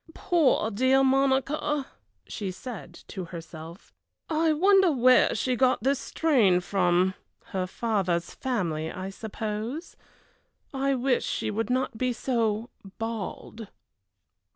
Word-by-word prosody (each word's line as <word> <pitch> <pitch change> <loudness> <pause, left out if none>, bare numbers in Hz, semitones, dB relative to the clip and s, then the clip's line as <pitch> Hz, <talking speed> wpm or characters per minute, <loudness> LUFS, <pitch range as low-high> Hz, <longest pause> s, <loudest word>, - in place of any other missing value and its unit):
"Poor 290 -10 +2
dear 260 +5 +3
Monica!" 275 +2 +1 0.4
she 200 -3 -5
said 190 0 -8 0.2
to 185 -2 -6
herself. 165 0 -10 0.4
"I 320 0 +2
wonder 380 +3 +5
where 255 -2 +4
she 255 -1 0
got 255 -2 +2
this 270 +1 +2
strain 235 - +3
from 180 0 +2 0.4
her 185 -1 -1
father's 185 -5 -1
family, 170 -11 -2
I 190 +1 -6
suppose 220 - -5 0.8
I 275 0 +1
wish 250 0 +1
she - - -2
would 225 +1 -2
not 255 -3 -1
be 255 -1 +1
so 230 -2 -1 0.3
bald." 225 0 -5
230 Hz, 115 wpm, -27 LUFS, 195-270 Hz, 0.8 s, wonder